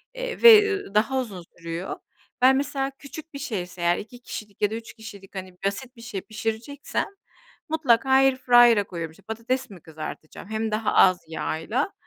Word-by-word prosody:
eee - - -5
ve 435 -3 +10 0.3
daha 265 +5 +2
uzun 200 -9 -5
sürüyor. 165 +2 -5 0.5
Ben, 260 +1 +7
mesela 275 -1 -1
küçük 310 +3 -10
bir 280 - -6
şeyse 180 -10 -5
eğer, 175 0 +3
2 240 +4 -9
kişilik 210 -4 -8
ya 210 0 +2
da - - -2
3 225 0 -8
kişilik 205 -4 -12
hani, 185 -1 -7
basit 245 +6 -3
bir 230 - -14
şey 210 -5 -5
pişireceksem, 225 +6 -3 0.6
mutlaka 270 -5 +2
airfryer'a 245 -4 +6
koyuyorum. 170 -4 -6
İşte 160 - -20
patates 230 +4 -3
mi 180 -5 -12
kızartacağım, 160 +4 -9
hem 220 0 -2
daha 215 0 0
az 185 -1 +6
yağla; 165 - -2
225 Hz, 165 wpm, -25 LUFS, 190-265 Hz, 0.6 s, ve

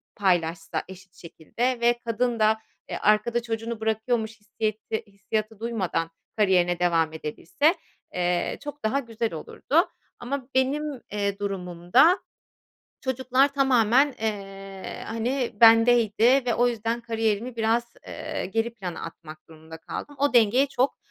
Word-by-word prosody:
paylaşsa 170 -4 0
eşit 190 0 -13
şekilde 215 +9 -3
ve 240 0 +3
kadın 235 +1 0
da, 215 0 +4 0.3
eee, - - -3
arkada 215 +3 +2
çocuğunu 225 0 -4
bırakıyormuş 220 0 -1
hissiyeti 215 0 -3
hissiyatı 215 +2 -4
duymadan 195 -8 -2 0.3
kariyerine 180 -4 +3
devam 165 -3 +2
edebilse, 170 - 0 0.4
eee, 175 -1 0
çok 290 0 -8
daha 260 +6 +2
güzel 230 -4 -3
olurdu. 295 - 0 0.3
Ama 255 +1 -4
benim, 275 +1 0
eee, 200 -1 -2
durumumda 195 - +2 0.8
çocuklar 260 +2 +1
tamamen, 265 0 +3
eee, 195 -3 -5
hani, 240 +3 -1
bendeydi 230 +2 +6
ve 240 - +1
o 245 - +3
yüzden 230 0 -2
kariyerimi 225 +1 -1
biraz, 230 +1 0
eee, - - -5
geri 225 +1 0
plana 185 -6 -6
atmak 160 -1 -11
durumunda 160 0 -12
kaldım. 290 - -7
O 285 -1 +2
dengeyi 240 +4 +5
çok, 260 +1 0
225 Hz, 125 wpm, -25 LUFS, 195-245 Hz, 0.8 s, bendeydi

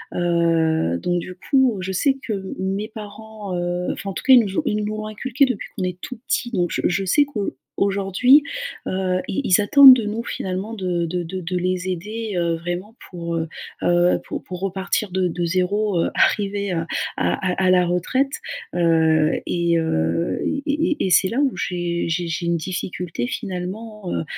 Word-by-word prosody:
Heu, 165 - +2
donc 175 - -1
du 180 +1 -7
coup, 260 +2 +2
je 190 - -3
sais 270 +9 +1
que 220 - -3
m 195 -1 -5
mes 195 +3 -2
parents, 215 -2 -8
heu, 175 0 -1
enfin, 200 - -5
en - - -7
tout - - -6
cas, 265 - +6
ils 250 - +9
nous 195 -1 -4
ont - - -1
ils 210 - 0
nous 215 0 -3
l'ont 215 - -5
inculqué 260 +5 +1
depuis 250 -6 -4
qu'on 185 - -2
est 180 0 -3
tout 255 - -7
petit, 240 - 0
donc 180 -6 0
je - - -1
je 190 +2 0
sais 290 +11 +4
qu'on 215 -8 -3 0.2
aujourd'hui, 200 +8 +4 0.4
heu, 185 -1 0
ils 240 - -1
ils 185 -2 +4
attendent 270 +4 +9
de 235 - -2
nous, 220 +3 -3
finalement, 190 +3 -4
de 180 -4 -1
de 175 +1 -2
de 185 +3 -5
de 180 +1 -2
les 185 +1 -1
aider, 210 +4 -4
heu, 170 -1 +1
vraiment 175 +6 -5
pour, 170 -2 -4
heu 165 0 -1 0.3
heu, 175 0 +3
pour - - -5
pour 180 -1 -7
repartir 195 +1 -1
de 185 0 +1
de 175 0 -3
0, 185 +2 +1
heu, - - 0
arrivés 200 -1 +1
à 165 -1 -1 0.3
à - - +1 0.2
à 190 - +1
à 185 - +4
la 180 -1 +4
retraite, 260 - 0 0.4
heu, 160 -2 +3
et 170 -1 +1
heu, 85 - 0
et 280 - -1
et 305 -1 0
et - - -1
c'est 185 +2 +4
là 235 - -1
où 280 -2 +3
j'ai 175 -1 -2
j'ai 175 +1 -1
j'ai 170 +1 -3
une 170 0 +1
difficulté, 180 +3 -4
finalement, 210 -2 -5
heu - - -1
185 Hz, 200 wpm, -22 LUFS, 175-215 Hz, 0.4 s, ils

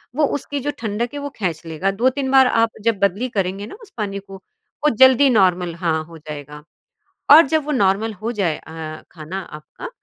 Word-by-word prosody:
वो 300 +1 +3
उसकी 285 +1 -5
जो 290 +2 -2
ठंडक 225 +2 -2
है 290 - -4
वो 285 - -4
खेंच 175 -7 -2
लेगा 165 +5 -1
2-3 265 +1 +1
बार 265 -1 +6
आप 230 -1 +2
जब 225 -4 +1
बदली 200 +6 0
करेंगे 195 -2 -2
ना 225 - -10
उस 415 - -16
पानी 200 -2 -3
को, 195 0 -14 0.5
वो - - +6
जल्दी 260 +2 +6
नॉर्मल 180 -6 +2
हाँ, 165 -2 -1
हो 165 0 -13
जाएगा। 150 -1 -9 0.7
और 315 - +11
जब 315 +1 +1
वो 300 - -2
नॉर्मल 215 -2 +1
हो 215 +4 -4
जाए 180 -9 -1
अ, 160 -1 -8
खाना 170 +3 -6
आपका 155 - -10
200 Hz, 195 wpm, -20 LUFS, 170-255 Hz, 0.7 s, और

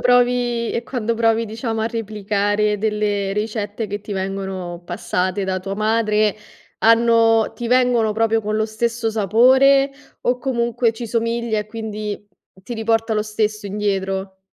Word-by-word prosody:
provi 245 -1 +2
e 235 - -2
quando 230 -3 -2
provi, 225 0 +2
diciamo, 225 +1 -3
a - - +1
replicare 210 -2 -1
delle 205 -2 0
ricette 210 +1 -3
che 205 +1 -4
ti 205 0 -7
vengono 190 -2 -4
passate 185 +2 -2
da 190 0 -1
tua 195 +1 -4
madre, 215 -1 +1 0.4
hanno 230 0 +4
ti 240 - -5
vengono 245 -3 +3
proprio 225 +1 +2
con 215 0 -2
lo 220 - +1
stesso 225 +1 -1
sapore, 260 +6 +4 0.3
o, 245 +1 +1
comunque, 235 -2 0
ci 230 +1 -6
somiglia 230 0 -1
e 210 - -3
quindi 215 -2 -5 0.4
ti 240 - -6
riporta 225 0 0
lo 210 - +1
stesso 215 0 -2
indietro? 195 -1 -2
220 Hz, 145 wpm, -20 LUFS, 205-230 Hz, 0.4 s, hanno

